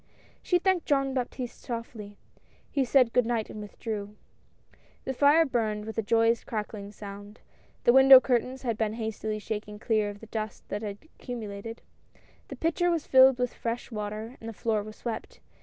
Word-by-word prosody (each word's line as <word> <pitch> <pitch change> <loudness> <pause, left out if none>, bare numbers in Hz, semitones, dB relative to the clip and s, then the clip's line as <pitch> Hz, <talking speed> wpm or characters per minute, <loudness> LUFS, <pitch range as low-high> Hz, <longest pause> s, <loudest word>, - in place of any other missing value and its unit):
She 360 - +2
thanked 370 -1 +1
Jean 275 -2 +2
Baptiste 250 -1 -4
softly 230 -4 -7 0.3
— - - -34
he 275 - +1
said 255 -2 +3
good 250 -2 +3
night 230 -3 -1
and 215 - -7
withdrew. 210 0 -6 0.9
The 265 - -2
fire 290 +5 +5
burned 220 -6 -1
with 220 - -6
a - - +3
joyous 230 +2 +2
crackling 210 -2 -5
sound; 205 0 -10 0.4
the 240 - +5
window 265 0 +10
curtains 255 +1 -1
had 230 -3 -2
been 215 -1 0
hastily 220 -1 -3
shaken 210 0 -5
clear 215 -1 0
of 205 0 -9
the 225 - -11
dust 215 -1 -5
that 205 - -3
had 205 -2 -5
accumulated; 225 -7 -8 0.6
the - - -7
pitcher 335 +2 +1
was 335 -3 0
filled 260 -1 +7
with 250 -1 -1
fresh 235 +1 -4
water 215 +3 -5
and 225 - -7
the - - -7
floor 220 0 0
was 215 +1 -9
swept. 240 - -6
225 Hz, 175 wpm, -28 LUFS, 210-260 Hz, 0.9 s, window